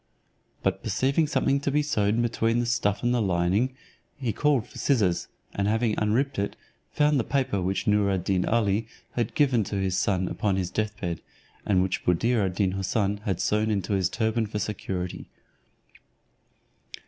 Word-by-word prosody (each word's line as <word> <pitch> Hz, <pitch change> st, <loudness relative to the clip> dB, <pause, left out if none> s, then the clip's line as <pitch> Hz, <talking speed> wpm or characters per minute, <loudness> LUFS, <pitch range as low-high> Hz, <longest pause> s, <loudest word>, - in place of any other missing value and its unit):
But -, -, 0 dB
perceiving 140 Hz, +4 st, +1 dB
something 140 Hz, -1 st, +1 dB
to 140 Hz, -, -1 dB
be 150 Hz, +2 st, +2 dB
sewed 110 Hz, -6 st, +1 dB
between 115 Hz, 0 st, +1 dB
the 120 Hz, -, 0 dB
stuff 115 Hz, -4 st, 0 dB
and 120 Hz, 0 st, +2 dB
the 120 Hz, -, +2 dB
lining, 95 Hz, +7 st, +1 dB, 0.4 s
he 125 Hz, -6 st, -2 dB
called 145 Hz, -6 st, +2 dB
for -, -, -11 dB
scissors, 105 Hz, -11 st, +1 dB, 0.3 s
and 100 Hz, 0 st, 0 dB
having 110 Hz, +1 st, +1 dB
unripped 115 Hz, +5 st, +1 dB
it, 100 Hz, -, -2 dB, 0.4 s
found 150 Hz, -1 st, +3 dB
the -, -, +1 dB
paper 130 Hz, -8 st, 0 dB
which 95 Hz, +2 st, -1 dB
Noor 105 Hz, -1 st, +3 dB
ad 95 Hz, -3 st, 0 dB
Deen 95 Hz, -1 st, +1 dB
Ali 110 Hz, -1 st, +1 dB, 0.2 s
had 120 Hz, -3 st, -2 dB
given 130 Hz, -7 st, +3 dB
to 100 Hz, -, -4 dB
his 95 Hz, -2 st, 0 dB
son 95 Hz, -1 st, +1 dB
upon 100 Hz, 0 st, 0 dB
his 95 Hz, -2 st, -2 dB
deathbed, 100 Hz, -6 st, -3 dB, 0.5 s
and 95 Hz, -3 st, +3 dB
which 95 Hz, -, -2 dB
Buddir 110 Hz, +6 st, +2 dB
ad 95 Hz, -2 st, -1 dB
Deen 95 Hz, -2 st, +1 dB
Houssun 100 Hz, +1 st, 0 dB
had 95 Hz, -4 st, -1 dB
sewn 105 Hz, +1 st, +1 dB
in 100 Hz, -3 st, 0 dB
his 95 Hz, -3 st, 0 dB
turban 110 Hz, +2 st, 0 dB
for 105 Hz, -, -4 dB
security. 95 Hz, -3 st, -4 dB
105 Hz, 170 wpm, -26 LUFS, 95-120 Hz, 0.5 s, found